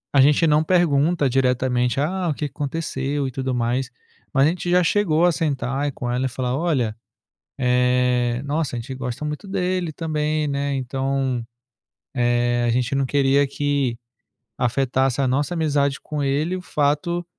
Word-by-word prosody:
A 135 - +7
gente 150 +4 +4
não 150 0 +4
pergunta 160 -3 +2
diretamente: 125 -1 +1
"Ah, 180 +4 -1
o 155 - +1
que 150 - -3
que - - -15
aconteceu 145 -2 -2
e - - -5
tudo 130 0 -3
mais". 120 +2 -1 0.4
Mas 135 -2 +4
a - - +4
gente 175 0 -3
já 180 0 +4
chegou 170 -3 +2
a 175 - +5
sentar 140 -2 -1
com 120 - -4
ela 125 +2 0
e - - -5
falar: 125 0 -2
"Olha, 135 -9 0 0.6
eh, 125 -1 +2
nossa, 145 -4 -1
a - - -3
gente 130 +3 -6
gosta 130 +2 -5
muito 150 +6 -5
dele 185 -3 -1
também, 155 -1 -1
né. 140 0 -1
Então, 135 -1 -1 0.7
eh, 120 0 +1
a - - +2
gente 125 +2 0
não 135 -1 +1
queria 140 +1 +3
que 140 -3 -1 0.6
afetasse 130 +1 +1
a 130 - +2
nossa 145 +7 0
amizade 145 -4 +1
com 150 -2 -4
ele 150 +6 0
o 185 - -5
fato 160 +3 0
140 Hz, 170 wpm, -22 LUFS, 125-155 Hz, 0.7 s, A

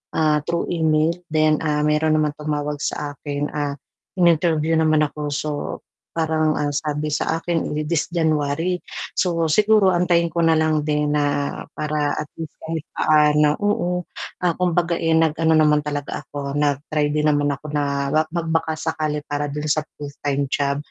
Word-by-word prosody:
Ah, 155 -1 +3
through 170 0 -1
email 160 -1 +2 0.2
then, 155 -1 +3
ah, 150 -1 +1
mayro'n 150 +1 +2
naman 150 -1 +2
tumawag 150 -1 -2
sa 145 -1 -2
akin, 145 0 -3
ah, 145 -1 -2 0.4
in-interview 165 -2 +3
naman 155 -1 +3
ako 150 0 -4
so, 150 +2 -2 0.6
parang 160 -1 +1
ang 150 -1 -1
sabi 150 +1 -2
sa 160 +2 -1
akin 165 -3 -1
di 150 - -1
this 170 -3 +1
January. 160 +1 0 0.4
So, 170 -3 +1
siguro 210 +3 +4
antayin 175 -1 +2
ko 170 +1 0
na 165 - +5
lang 155 -1 +1
din 150 -1 +1
na 145 -1 -1
para 150 -1 -1
at 150 - -4
least 160 -2 -6
kahit 160 -1 -4
paano 150 -1 +3
oo, 205 -3 0 0.6
ah, 175 - +3
kumbaga, 175 -1 +1
eh, 165 - 0
nag-ano 160 0 +3
naman 150 -1 +4
talaga 145 -1 -4
ako, 140 -1 -6
nag-try 145 +1 0
din 150 0 0
naman 145 0 +1
ako 150 - -23
na 140 -1 -1
ma 155 - +5
mag 170 0 -3
baka 160 -1 0
sakali 155 -2 -2
para 145 0 -2
do'n 150 +1 -4
sa 155 0 +1 0.2
full-time 145 -1 -2
job 140 -1 +1
155 Hz, 165 wpm, -22 LUFS, 145-160 Hz, 0.6 s, na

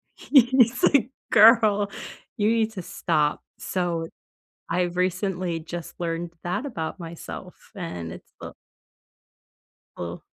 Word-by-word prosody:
he's 255 -2 +4
like, 265 -2 +4 0.2
"Girl, 215 -2 +6 0.4
you 210 +1 +2
need 225 -1 +2
to 185 - -5
stop." 150 -3 0 0.2
So, 175 -3 -2 0.6
I've 175 0 0
recently 185 -2 -1
just 170 +1 -8
learned 170 0 -3
that 180 +10 -2
about 175 - -5
myself, 170 +2 -9
and 90 - -5
it's, - - -13
uh - - -7 1.5
Uh 85 0 -6
180 Hz, 110 wpm, -25 LUFS, 165-215 Hz, 1.5 s, Girl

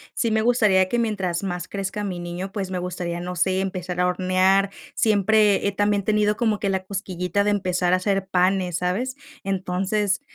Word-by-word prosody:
sí 230 -2 0
me 220 - +2
gustaría 215 -6 +3
que 240 - 0
mientras 195 -6 -1
más 180 -2 -3
crezca 200 +1 -4
mi 190 -3 -3
niño, 175 +2 -5
pues, 195 -3 -4
me 185 - -2
gustaría, 175 -1 -4
no 180 +1 -5
sé, 185 +2 +1
empezar 180 -2 -4
a 180 - +3
hornear. 185 +2 +2 0.2
Siempre 210 -1 +3
he 200 - -1
también 205 0 +1
tenido 210 0 +1
como 220 -4 +1
que 200 - -1
la 190 -1 -1
cosquillita 190 -1 -2
de 210 - +2
empezar 180 -2 +1
a - - +5
hacer 195 0 -1
panes, 185 -1 +1
¿sabes? 205 +10 -2 0.3
Entonces, 195 +3 -1
190 Hz, 185 wpm, -23 LUFS, 180-205 Hz, 0.3 s, a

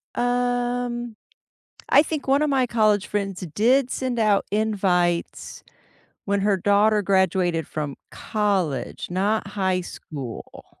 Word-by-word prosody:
Um, 245 -1 -1 0.7
I 285 - +6
think 310 -2 -4
one 275 +2 +3
of 300 - +1
my 265 -2 +2
college 215 -4 +2
friends 195 -2 -3
did 250 - +3
send 255 -2 -2
out 210 -2 +3
invites 190 -5 0 0.6
when 200 0 0
her 200 -1 +2
daughter 205 +3 +3
graduated 185 -4 +1
from 145 -3 -4 0.2
college, 195 - -2
not 200 +4 0
high 190 -3 -1
school. 140 -8 -9
205 Hz, 115 wpm, -23 LUFS, 185-240 Hz, 0.7 s, I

